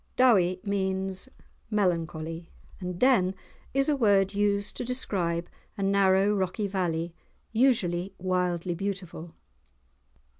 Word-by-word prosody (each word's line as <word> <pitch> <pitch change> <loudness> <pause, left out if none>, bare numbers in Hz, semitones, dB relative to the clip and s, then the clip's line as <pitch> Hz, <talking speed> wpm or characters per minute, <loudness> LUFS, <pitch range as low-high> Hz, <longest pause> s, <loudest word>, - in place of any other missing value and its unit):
"Dowie" 190 -8 +4
means 190 +1 -1 0.4
melancholy, 165 -5 -1 0.3
and 180 -1 -5
"den" 195 -6 +3 0.4
is 275 0 +2
a 300 - +3
word 200 -6 +3
used 205 0 0
to - - -2
describe 180 -9 -1 0.3
a 200 - -2
narrow, 195 +1 +4
rocky 195 +1 -1
valley, 175 -4 -1 0.4
usually 195 -7 +1
wildly 180 -1 -1
beautiful. 180 -3 -5
190 Hz, 105 wpm, -28 LUFS, 175-205 Hz, 0.4 s, Dowie